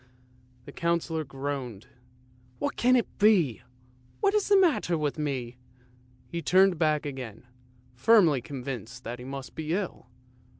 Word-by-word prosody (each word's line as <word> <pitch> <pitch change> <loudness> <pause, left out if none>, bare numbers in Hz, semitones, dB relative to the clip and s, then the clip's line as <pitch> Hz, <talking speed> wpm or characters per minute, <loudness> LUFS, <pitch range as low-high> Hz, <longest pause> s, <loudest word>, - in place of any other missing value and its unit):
" 125 0 -32
the - - -9
Councillor 170 -1 -1
groaned. 135 -5 -5 0.4
" 125 0 -31
What - - -2
can 250 +1 +4
it 240 - -1
be? 185 - +4 0.6
What 400 -1 +2
is 425 -2 +1
the 405 - +5
matter 320 - +2
with 150 0 -2
me? 130 -5 -3 0.4
" 125 0 -31
He 170 -1 -3
turned 185 +1 +4
back 155 -2 +1
again, 130 -6 -7 0.5
firmly 160 - +4
convinced 125 -2 -7
that 120 +2 -6
he 125 - -9
must 135 0 -7
be 160 0 -3
ill. 190 -9 -4
140 Hz, 155 wpm, -28 LUFS, 125-170 Hz, 0.6 s, the